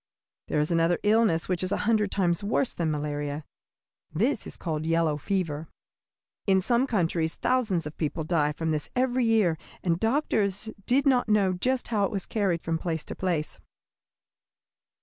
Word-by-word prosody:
There 150 - 0
is 150 +3 0
another 165 +1 +3
illness 210 -6 +3
which 180 -2 -1
is 185 +1 -1
a - - +1
hundred 215 -2 +2
times 175 -2 0
worse 230 +5 0
than 170 -2 -1
malaria. 145 0 -3 0.7
This 225 - 0
is - - -7
called 155 -2 -3
yellow 165 -2 +2
fever. 160 -1 -2 0.8
In 190 -1 +5
some 240 +7 +2
countries 165 -7 0
thousands 230 -10 0
of 150 - -6
people 160 +1 -2
died 150 -2 +1
from 160 -1 -1
this 150 -1 -2
every 255 -1 +2
year, 210 -8 +3 0.2
and 170 -2 +1
doctors 220 -4 0 0.2
did 270 +4 +3
not 250 -4 +3
know 200 -3 +3
just 250 +8 -1
how 210 -4 +1
it - - -3
was 195 -3 -3
carried 190 -6 0
from 165 0 -1
place 160 -3 -3
to - - -7
place. 170 -5 -2
180 Hz, 170 wpm, -27 LUFS, 160-220 Hz, 0.8 s, In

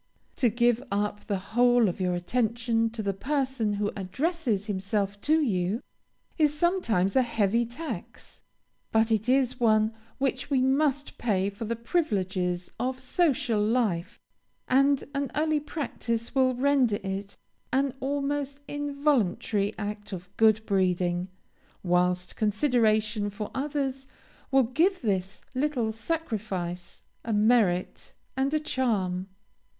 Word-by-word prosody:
To 245 - +4
give 240 +1 +2
up 205 +1 -2
the 200 - 0
whole 240 +4 +3
of 185 +1 -3
your 180 -1 +1
attention 230 +4 0
to 225 -1 -5
the 200 -1 0
person 260 -1 -1
who 205 0 -1
addresses 235 - -1
himself 200 0 -2
to 310 +2 +3
you, 205 -1 0 0.6
is 300 -1 +3
sometimes 265 - +1
a 260 - +6
heavy 230 -1 +1
tax, 310 +7 -8 0.5
but 220 +1 +3
it 220 +2 +1
is 255 -1 +2
one 220 -1 +3 0.2
which 270 0 -1
we 275 -3 +2
must 280 +2 +1
pay 200 -4 +1
for 200 +3 -6
the 235 +2 -2
privileges 190 - -1
of 255 +1 -1
social 255 -5 +1
life, 210 -6 0 0.5
and 275 +2 +3
an 280 -2 -1
early 310 +1 +2
practice 240 -6 -3
will 260 -1 +3
render 260 -4 +3
it 195 +1 -5 0.3
an 270 0 +1
almost 280 0 -2
involuntary 280 - 0
act 205 0 -5
of 180 +1 -8
good 220 -1 +4
breeding; 180 -2 +1 0.6
whilst 180 0 +1
consideration 215 -2 +2
for 205 +1 -6
others 270 -1 -2 0.4
will 270 -1 +5
give 330 - +1
this 195 -2 -1
little 260 -4 0
sacrifice 215 - -4 0.2
a 230 - -3
merit 210 -4 +2 0.2
and 270 +1 +1
a - - +3
charm. 200 -11 -1
230 Hz, 125 wpm, -27 LUFS, 200-270 Hz, 0.6 s, a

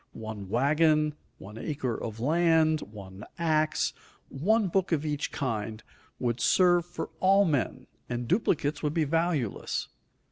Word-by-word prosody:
One 110 -3 -7
wagon, 150 +5 +3 0.2
one 105 +3 -10
acre 130 -5 -2
of 110 -1 -6
land, 160 +2 +3
one 100 -1 -10
ax, 155 -2 +1 0.4
one 205 +9 +1
book 185 +1 0
of 155 -2 +1
each 150 -1 -2
kind, 110 -4 -3 0.3
would 120 -1 -1
serve 175 -2 +4
for 175 -2 -6
all 195 +2 +5
men, 145 -8 -1 0.2
and 120 0 -3
duplicates 155 - +1
would 150 +1 -1
be 165 - +3
valueless. 155 - -1
150 Hz, 135 wpm, -28 LUFS, 120-165 Hz, 0.4 s, all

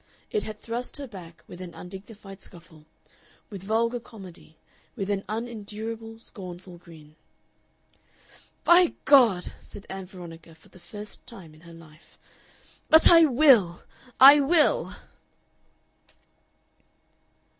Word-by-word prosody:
It 430 - -1
had 215 -1 -8
thrust 240 +4 -6
her 285 - -7
back 180 -8 -13
with 180 - -12
an 175 -2 -10
undignified 195 +2 -12
scuffle, 165 -3 -16 0.7
with 200 -3 -8
vulgar 230 +4 -1
comedy, 190 -8 -15 0.4
with 200 -4 -4
an 200 -1 -2
unendurable, 225 0 -7
scornful 180 -5 -12
grin. 155 -3 -17 1.5
"By 345 0 +4
God!" 235 -11 +4
said 200 - -13
Ann 190 -1 -7
Veronica 170 -3 -13
for 160 - -23
the 185 - -18
first 210 +5 -12
time 190 -10 -12
in 155 - -20
her 170 0 -15
life. 155 -1 -19 0.7
"But 320 +1 +7
I 330 -1 +7
will! 245 - +3 0.4
I 280 +3 +9
will!" 300 +2 +1
200 Hz, 115 wpm, -25 LUFS, 175-235 Hz, 1.5 s, I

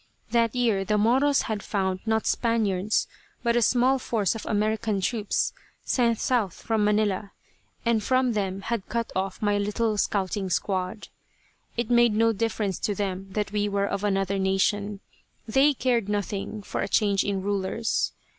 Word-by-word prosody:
That 230 -1 +2
year 225 -6 +2
the 210 +2 +1
Moros 260 +6 +3
had 215 -2 -3
found 190 -3 -1
not 220 0 +1
Spaniards 215 -4 +1 0.4
but 235 -1 +2
a 240 - +3
small 255 +3 +3
force 215 -7 0
of 225 - -6
American 215 -1 0
troops, 210 +2 0 0.3
sent 235 -3 +2
south 225 -8 0
from 220 -2 -1
Manila, 210 -1 +1 0.5
and 230 -2 +2
from 255 +2 +2
them 195 -2 -2
had 230 -1 -3
cut 235 0 -2
off 190 +2 -2
my 205 -1 +2
little 210 +1 0
scouting 195 -1 -1
squad. 185 +3 -2 0.7
It 235 0 -1
made 235 -2 +5
no 225 +1 +3
difference 215 -3 -1
to 205 - -1
them 195 -1 -3
that 210 -1 -2
we 210 0 0
were 200 0 0
of 200 0 -3
another 195 -1 0
nation. 200 +1 0 0.5
They 270 +6 +4
cared 235 -5 0
nothing 205 0 -3
for - - -3
a - - -1
change 200 -1 +2
in 195 -2 -2
rulers. 205 +3 -1
210 Hz, 160 wpm, -26 LUFS, 195-230 Hz, 0.7 s, made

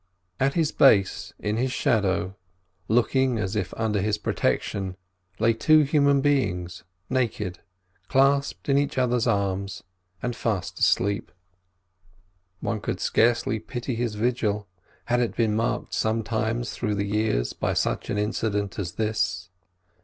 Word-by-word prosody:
At 135 +1 +1
his 160 -3 +2
base, 100 -8 +4
in 105 +1 -2
his 130 +2 0
shadow, 95 -6 +1 0.5
looking 125 +2 +2
as 105 -1 -2
if 95 -6 -1
under 110 -3 0
his 105 +1 0
protection, 95 -2 -1 0.4
lay 115 +1 +3
two 155 +7 +5
human 140 -1 +3
beings, 95 - 0 0.2
naked, 110 -8 -1 0.5
clasped 140 +3 +2
in 140 0 +4
each 145 0 -2
other's 125 -1 +2
arms, 100 -2 -1 0.4
and 120 +2 -3
fast 110 -6 -2
asleep. 100 +2 +1 1.3
One 110 -3 -2
could - - -3
scarcely 115 -1 +2
pity 120 +3 -5
his 115 -2 -2
vigil, 105 -3 0 0.4
had 120 0 +1
it 120 -2 -1
been 110 -2 +1
marked 115 +2 -1
sometimes 115 +1 -1
through 105 -3 -2
the 100 0 -1
years 100 - 0
by - - -1
such - - -1
an - - -1
incident 105 -2 -1
as 90 -4 -3
this. 105 -5 -1
110 Hz, 135 wpm, -25 LUFS, 100-125 Hz, 1.3 s, two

